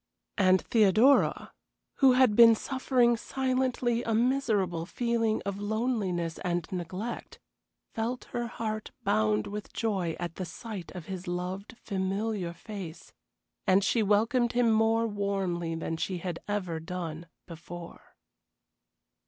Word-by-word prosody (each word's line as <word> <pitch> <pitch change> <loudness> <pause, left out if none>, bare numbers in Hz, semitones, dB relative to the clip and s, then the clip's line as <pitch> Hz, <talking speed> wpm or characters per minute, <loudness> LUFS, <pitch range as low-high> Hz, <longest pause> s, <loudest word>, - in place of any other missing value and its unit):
And 185 -1 +4
Theodora, 225 +5 +4 0.4
who 265 -2 +6
had 250 -4 +4
been 230 0 +8
suffering 255 -1 +2
silently 255 -1 0
a 225 -2 -1
miserable 215 -9 +1
feeling 230 -1 0
of 200 0 -3
loneliness 205 -7 -1
and 175 -2 -1
neglect, 185 +6 -5 0.6
felt 235 +3 -2
her 240 0 -2
heart 215 -2 -4
bound 105 0 +2
with 210 0 -7
joy 190 -7 -1
at 175 -1 -5
the 185 - -3
sight 205 -2 -7
of 175 -3 -7
his 185 0 -6
loved, 185 +5 -4
familiar 195 -1 -2
face, 175 -2 -9 0.5
and 190 +1 +5
she 225 +3 +2
welcomed 225 +4 +2
him 240 -2 +3
more 225 +1 +3
warmly 195 -5 -1
than 165 0 -3
she 185 +2 -2
had 175 -1 -4
ever 185 -6 -2
done 165 -1 -5 0.2
before. 170 0 -10
205 Hz, 125 wpm, -29 LUFS, 175-230 Hz, 0.6 s, been